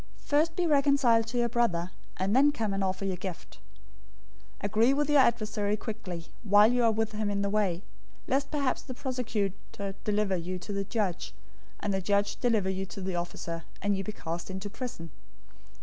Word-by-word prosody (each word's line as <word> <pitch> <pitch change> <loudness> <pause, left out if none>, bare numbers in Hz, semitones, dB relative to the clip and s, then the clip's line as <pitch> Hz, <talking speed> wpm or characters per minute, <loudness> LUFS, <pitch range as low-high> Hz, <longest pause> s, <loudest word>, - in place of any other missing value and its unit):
First 315 +3 +2
be 360 - +1
reconciled 275 -6 +4
to 240 +2 -3
your 240 0 +3
brother, 200 -7 +1 0.3
and 195 +4 +1
then 285 +3 +6
come 220 -7 -2
and 195 0 0
offer 190 +1 -1
your 190 -2 -1
gift. 185 -1 -7 1.0
005:025 - - -2
Agree 220 +6 +4
with 295 +1 +1
your 295 - +6
adversary 215 -4 +2
quickly, 185 -7 -6 0.2
while 205 +2 +6
you 245 -1 +2
are 230 - +5
with 220 0 0
him 215 -1 -1
in 200 0 0
the 200 - 0
way; 195 -4 +1 0.4
lest 275 +2 +1
perhaps 280 -4 0
the 255 - -8
prosecutor 210 -6 -3
deliver 210 -2 +1
you 180 +1 -3
to 190 +3 -6
the 200 0 -1
judge, 200 -5 -2 0.5
and 205 - 0
the 190 - 0
judge 200 +2 +1
deliver 225 -6 +2
you 190 0 -3
to 180 - -8
the 190 -1 -3
officer, 170 -1 -4 0.2
and 205 0 +1
you 195 - -2
be 215 - -4
cast 170 -3 -5
into 190 +2 -5
prison. 225 - -6
210 Hz, 190 wpm, -29 LUFS, 190-240 Hz, 1.0 s, then